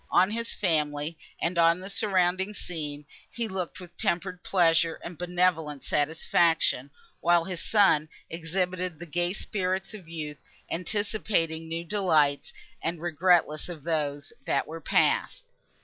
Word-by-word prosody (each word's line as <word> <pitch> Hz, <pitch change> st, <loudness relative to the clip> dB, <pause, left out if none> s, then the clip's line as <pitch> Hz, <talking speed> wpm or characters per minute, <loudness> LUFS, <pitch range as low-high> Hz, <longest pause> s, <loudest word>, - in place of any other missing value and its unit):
On 185 Hz, +3 st, +4 dB
his 230 Hz, +1 st, -2 dB
family, 150 Hz, -4 st, 0 dB, 0.2 s
and 170 Hz, +1 st, 0 dB
on 170 Hz, +1 st, +5 dB
the 190 Hz, -, -8 dB
surrounding 190 Hz, -1 st, +1 dB
scene, 150 Hz, -6 st, -5 dB, 0.2 s
he 235 Hz, -1 st, -3 dB
looked 185 Hz, -2 st, -4 dB
with 175 Hz, -1 st, -12 dB
tempered 180 Hz, +1 st, -1 dB
pleasure 165 Hz, -3 st, +3 dB
and 170 Hz, -, -6 dB
benevolent 175 Hz, -4 st, 0 dB
satisfaction, 160 Hz, -2 st, +2 dB, 0.3 s
while 175 Hz, 0 st, +4 dB
his 180 Hz, -1 st, -4 dB
son 190 Hz, -8 st, +4 dB, 0.2 s
exhibited 180 Hz, +1 st, -2 dB
the 175 Hz, -, -8 dB
gay 175 Hz, +2 st, 0 dB
spirits 190 Hz, 0 st, -2 dB
of 190 Hz, -6 st, -10 dB
youth, 150 Hz, -3 st, -5 dB, 0.3 s
anticipating 175 Hz, -3 st, -1 dB
new 165 Hz, +1 st, -3 dB
delights, 160 Hz, -7 st, +2 dB, 0.3 s
and 170 Hz, 0 st, -2 dB
regretless 170 Hz, -1 st, +2 dB
of 160 Hz, -5 st, -8 dB
those, 145 Hz, -3 st, -2 dB
that 140 Hz, -, +2 dB
were 165 Hz, +1 st, -8 dB
passed. -, -, +2 dB
170 Hz, 135 wpm, -28 LUFS, 160-185 Hz, 0.3 s, on